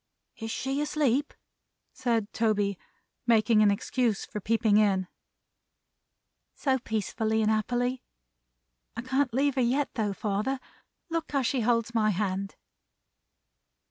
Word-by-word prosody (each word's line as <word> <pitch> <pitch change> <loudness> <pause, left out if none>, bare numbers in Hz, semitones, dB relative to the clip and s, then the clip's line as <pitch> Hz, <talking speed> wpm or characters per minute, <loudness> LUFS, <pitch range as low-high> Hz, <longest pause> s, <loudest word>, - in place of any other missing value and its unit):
"Is 225 0 -5
she 270 +5 -2
asleep?" 290 -2 +1 0.6
said 230 -4 -1
Toby, 205 -4 +1 0.5
making 220 -1 +4
an 210 - +6
excuse 220 +2 0
for 210 - -6
peeping 220 0 +2
in. 195 -3 +3 1.5
"So 265 -2 +1
peacefully 220 0 -1
and 215 - +3
happily! 245 +4 0 0.9
I 235 - -4
can't 265 +1 +1
leave 275 +4 +2
her 260 - 0
yet 265 +4 +1
though, 210 -4 -1
father. 210 +7 -1 0.5
Look 330 -2 -3
how 275 -2 +2
she 255 +1 0
holds 230 0 +1
my 215 -2 +3
hand!" 195 0 -2
230 Hz, 120 wpm, -28 LUFS, 210-260 Hz, 1.5 s, an